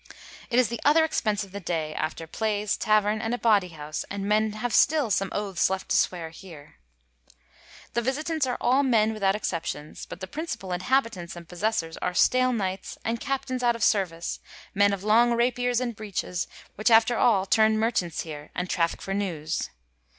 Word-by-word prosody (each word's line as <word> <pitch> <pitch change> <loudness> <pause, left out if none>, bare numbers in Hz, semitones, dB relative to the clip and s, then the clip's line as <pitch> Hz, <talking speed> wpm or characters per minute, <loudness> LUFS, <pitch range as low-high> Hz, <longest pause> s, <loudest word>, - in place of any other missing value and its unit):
It 240 - +1
is 250 -3 +4
the 235 -1 -4
other 315 +3 +5
expence 215 -9 0
of 195 - -12
the 200 - -6
day, 160 -4 -2
after 155 +2 -3
Playes, 210 +3 -1
Tauerne, 215 0 +2
and 230 +1 -1
a - - -5
Baudy 210 -6 +3
House, 150 0 -5
and 200 0 -4
men 215 0 +2
haue 215 +3 -3
still 285 0 +3
some 195 +1 +1
Oathes 195 -3 0
left 190 0 -3
to - - +2
sweare 165 -3 0
here.... 160 -4 -13 1.2
The 235 - +1
Visitants 295 +4 -1
are 250 - -1
all 260 +3 +3
men 225 -5 +3
without 195 -2 +1
exceptions, 165 -7 -4
but - - -8
the 190 - -5
principall 290 - -5
Inhabitants 185 -2 0
and 170 -1 -10
possessors 180 -2 -2
are 180 0 -3
stale 255 +4 +4
Knights, 190 -5 -3
and 230 +1 -1
Oaptaines 270 -2 -2
out 240 -1 +3
of 230 - -3
Seruice, 175 -5 0 0.3
men 200 +1 +4
of 200 -1 -3
long 235 +3 +4
Rapiers, 245 0 +1
and 240 -2 -3
Breeches, 195 -4 -3 0.3
which 215 +2 +1
after 225 +1 +5
all 205 -5 +3
tume 220 +2 +4
merchants 215 -7 0
here, 150 -2 -8
and 180 - -2
trafficke 165 -1 0
for 195 - -3
newes. 170 -6 -2
210 Hz, 185 wpm, -26 LUFS, 180-235 Hz, 1.2 s, other